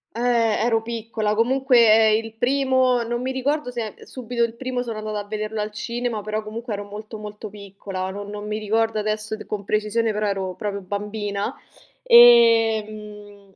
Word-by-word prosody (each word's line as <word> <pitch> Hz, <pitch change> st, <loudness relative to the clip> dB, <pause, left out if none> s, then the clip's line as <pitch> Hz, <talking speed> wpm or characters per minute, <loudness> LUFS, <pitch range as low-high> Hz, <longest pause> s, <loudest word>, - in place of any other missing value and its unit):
Ehm, 235 Hz, -, -3 dB, 0.4 s
ero 225 Hz, -2 st, +2 dB
piccola. 225 Hz, -2 st, -2 dB
Comunque 230 Hz, -2 st, +4 dB
ehm, 225 Hz, -, -3 dB
il 225 Hz, 0 st, -9 dB
primo, 260 Hz, 0 st, +2 dB
non 240 Hz, +1 st, -3 dB
mi 260 Hz, -, -2 dB
ricordo 265 Hz, +1 st, -1 dB
se 230 Hz, -4 st, -5 dB
subito 240 Hz, -2 st, -3 dB
il 230 Hz, -1 st, -1 dB
primo 250 Hz, 0 st, -3 dB
sono 225 Hz, -3 st, -5 dB
andata 215 Hz, 0 st, -4 dB
a -, -, -4 dB
vederlo 215 Hz, +1 st, -4 dB
al 210 Hz, 0 st, -3 dB
cinema, 235 Hz, +1 st, -3 dB
però 215 Hz, +1 st, -3 dB
comunque 225 Hz, +1 st, -6 dB
ero 205 Hz, 0 st, -4 dB
molto, 215 Hz, +2 st, -9 dB
molto 210 Hz, 0 st, -8 dB
piccola. 195 Hz, -2 st, -6 dB
Non 205 Hz, +1 st, -7 dB
non 210 Hz, 0 st, -7 dB
mi 215 Hz, 0 st, -3 dB
ricordo 220 Hz, +1 st, 0 dB
adesso 215 Hz, +1 st, -2 dB
d -, -, -11 dB
con 205 Hz, -1 st, -4 dB
precisione, 215 Hz, +2 st, 0 dB
però 210 Hz, 0 st, -1 dB
ero 190 Hz, -2 st, -2 dB
proprio 200 Hz, 0 st, -4 dB
bambina, 205 Hz, +1 st, -3 dB, 0.5 s
ehm, 215 Hz, -, +4 dB
215 Hz, 175 wpm, -22 LUFS, 210-235 Hz, 0.5 s, Comunque